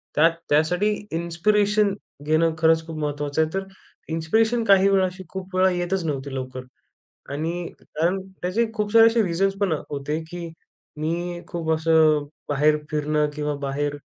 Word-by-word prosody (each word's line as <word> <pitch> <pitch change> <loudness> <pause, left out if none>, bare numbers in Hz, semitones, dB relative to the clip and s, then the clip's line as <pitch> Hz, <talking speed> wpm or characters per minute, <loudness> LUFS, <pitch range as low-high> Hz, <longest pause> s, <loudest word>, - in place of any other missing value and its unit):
त्यात 165 +2 +5 0.2
त्यासाठी 175 +8 +2 0.2
इन्स्पिरेशन 205 +5 +2 0.3
घेणं, 160 +1 +2
खरंच 160 0 +3
खूप 160 -1 -6
महत्त्वाचं 145 0 -1
आहे. 155 - +1
तर 195 0 -2 0.5
इन्स्पिरेशन 220 +8 +1
काही 195 -1 +5
वेळा, 190 -1 +4
अशी 185 +1 -6
खूप 190 -1 -7
वेळा 185 0 +4
येतच 175 +1 -1
नव्हती 140 -2 -3
लवकर 130 0 -5 0.7
आणि 155 +4 -2 0.3
कारण 170 +5 -1 0.2
त्याचे 185 +7 +1
खूप 210 -1 -2
सारे 225 0 +8
असे 230 0 +3
रिझन्स 195 +2 +1
पण 195 - +2 0.2
होते 145 +1 -3
की 175 -1 -5 0.5
मी, 175 +3 -3
खूप 165 -2 -4
असं 155 -2 +3 0.2
बाहेर 150 +1 +3
फिरणं 150 0 +1
किंवा 150 0 -2
बाहेर 145 +1 -2
165 Hz, 150 wpm, -23 LUFS, 150-190 Hz, 0.7 s, सारे